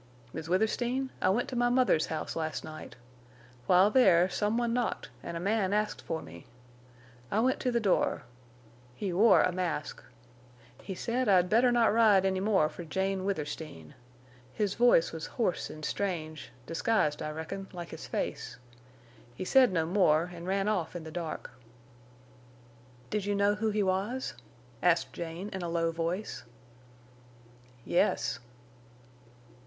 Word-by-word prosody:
"Miss 160 0 -6
Withersteen, 240 +7 0
I - - +3
went 225 +6 +1
to 255 - -5
my 240 0 +2
mother's 245 -10 +3
house 160 - -4
last 160 -1 -3
night. 155 0 -9 0.7
While 185 +3 +5
there, 185 -9 +5
some 210 +4 0
one 240 -1 0
knocked, 245 -1 -2
an' 170 - -6
a - - -3
man 200 +1 0
asked 210 0 0
for 160 -1 -4
me. 85 +1 -12 0.8
I 210 - +1
went 255 +3 +2
to 250 - 0
the 235 - +2
door. 200 -5 +1 0.7
He 195 +2 -3
wore 195 -2 +6
a 185 - +2
mask. 175 -4 -3 0.8
He 190 - -6
said 245 +4 -1
I'd 180 -2 +4
better 240 +3 +5
not 235 -3 +3
ride 215 -4 +5
any 190 -1 +1
more 195 -5 +3
for 155 +3 -8
Jane 190 +3 -2
Withersteen. 150 - -5 0.6
His 205 -2 0
voice 240 -8 +4
was 160 -1 -6
hoarse 220 -8 0
an' 155 - -10
strange, 155 -5 -3 0.2
disguised 165 - 0
I - - -3
reckon, 160 +6 -6
like 175 -2 -7
his - - -8
face. - - -4 0.8
He 185 - -5
said 255 +2 +5
no 165 -3 +1
more, 175 -2 +2
an' 170 0 -8
ran 195 +2 0
off 180 -6 -1
in 175 - -5
the 160 - -8
dark." 165 -5 -5 1.6
"Did 210 -2 -1
you 205 - +1
know 200 +1 +3
who 220 +1 -1
he 210 -1 +1
was?" 200 +7 -1 0.5
asked 175 -1 +2
Jane, 170 +4 -6
in 190 - -5
a 170 - -3
low 165 0 0
voice. 170 +5 -3 1.4
"Yes." - - +1
190 Hz, 155 wpm, -30 LUFS, 165-215 Hz, 1.6 s, wore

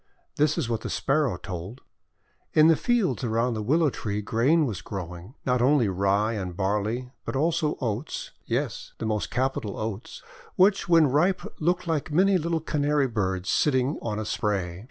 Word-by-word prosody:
This 150 +2 +2
is 160 -8 -1
what 115 -2 -2
the - - -5
Sparrow 135 - +1
told: 95 +6 -7 0.4
— - - -43
In 155 +1 +7
the 165 - +6
fields 205 - 0
around 115 +1 +1
the 110 - -3
Willow 150 +7 +2
Tree 105 -3 -3
grain 125 +10 +2
was 105 -7 -4
growing; 90 - -7
not 125 -2 +2
only 130 -4 +4
Rye 100 +4 +1
and 90 -5 -5
Barley, 105 +6 -1
but - - -5
also 155 +1 +1
Oats, 115 +5 -3
— - - -41
yes, - - -3
the - - -4
most 105 -1 -1
capital 130 -5 -2
Oats, 110 +1 -5 0.2
— 475 -2 -23
which 195 -1 +3
when 165 -2 +6
ripe 160 +8 +2 0.2
looked 175 +3 0
like 160 -2 -2
many 190 +4 +4
little 165 0 -1
Canary 150 -2 +1
birds 95 -5 -1
sitting 135 0 +1
on 105 -2 -3
a 110 - -3
spray. 95 -5 -2
125 Hz, 180 wpm, -26 LUFS, 105-155 Hz, 0.4 s, In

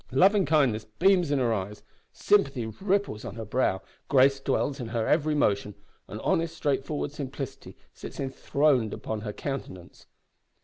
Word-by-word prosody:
Loving 190 +8 +4
kindness 135 -8 +2
beams 180 -2 +4
in 145 - +2
her 120 -3 +1
eyes, 105 0 -5 0.3
sympathy 140 - +2
ripples 190 - -1
on 100 - -7
her 115 -1 -6
brow, 105 -4 0 0.2
grace 135 0 +4
dwells 135 +1 -1
in 120 - -4
her 115 -1 -1
every 150 0 +2
motion, 105 -6 +1 0.3
and 105 - -7
honest, 165 0 0
straightforward 145 0 -1
simplicity 140 -2 -7 0.2
sits - - -10
enthroned 135 -3 +1
upon 110 -1 -5
her 105 -1 -4
countenance!" 105 - -7
135 Hz, 145 wpm, -27 LUFS, 110-150 Hz, 0.3 s, Loving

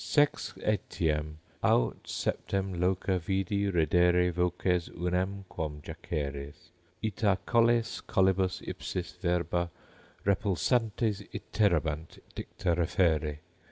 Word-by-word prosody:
Sex 145 -1 +2
etiam, 75 -7 0 0.3
aut - - +2
septem 95 -1 -1
loca 95 +1 +1
vidi 95 +3 0
reddere 90 +1 +4
voces 90 0 +1
Unam 90 +3 -2
quom 75 -4 -4
jaceres: 75 +5 -5 0.3
ita 105 -2 +2
colles 115 -1 +3
collibus 95 -1 +2
ipsis 90 -1 -4
Verba 85 -1 0 0.6
repulsantes 105 +2 +1
iterabant 80 -6 0 0.2
dicta 90 -2 -2
referre. 80 -3 +2
90 Hz, 85 wpm, -30 LUFS, 85-100 Hz, 0.6 s, reddere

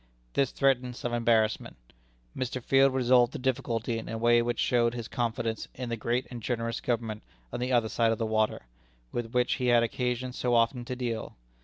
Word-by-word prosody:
This 135 -2 +2
threatened 125 -3 +1
some 120 -1 -4
embarrassment. 115 -2 +1 0.6
Mr. 130 0 -3
Field 135 +2 +4
resolved 125 -1 +3
the - - -3
difficulty 120 -3 -1
in - - -8
a 115 - -3
way 120 +1 +4
which 120 0 -1
showed 120 -1 +2
his 120 -2 -5
confidence 115 -2 -2
in 125 -1 -5
the 115 - -1
great 120 +3 -1
and 120 -2 -6
generous 115 -1 -2
Government 115 -3 -2 0.3
on 120 - -3
the 125 +1 -2
other 120 -3 +3
side 115 +1 +2
of 115 - 0
the 115 - -1
water, 110 - 0 0.5
with 120 -1 -4
which 125 0 +2
he 125 - +1
had 120 -1 +5
occasion 125 +2 -2
so 125 -1 0
often 120 +1 +2
to 125 - -4
deal. 120 -3 -4
120 Hz, 195 wpm, -28 LUFS, 115-125 Hz, 0.6 s, had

